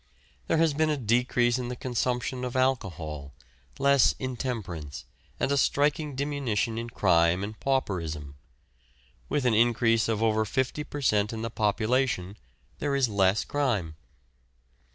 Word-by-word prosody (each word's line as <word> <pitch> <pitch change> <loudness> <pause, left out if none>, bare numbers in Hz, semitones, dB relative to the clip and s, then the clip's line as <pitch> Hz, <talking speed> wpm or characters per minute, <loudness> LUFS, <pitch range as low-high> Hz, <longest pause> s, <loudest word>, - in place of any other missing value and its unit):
There - - +2
has 160 -2 +3
been 155 +2 +1
a 150 - +1
decrease 120 0 +2
in 125 - -3
the 125 - -4
consumption 125 +1 -2
of 125 0 -4
alcohol, 85 - -2 0.4
less 140 -2 +4
intemperance, 115 - -5 0.3
and - - 0
a 140 - +2
striking 145 +2 +1
diminution 130 -6 -1
in 115 0 -5
crime 90 -3 +3
and 105 +1 -6
pauperism. 85 - -2 0.9
With 140 - 0
an 125 - +3
increase 115 0 +3
of 110 0 0
over 110 -1 +2
fifty 130 +7 -1
per 145 -1 -7
cent. 105 -5 +2
in 110 0 -4
the 115 - -3
population 110 -2 0 0.4
there 145 -1 0
is 135 -3 +2
less 100 0 +2
crime. 110 - -1
120 Hz, 140 wpm, -27 LUFS, 100-130 Hz, 0.9 s, less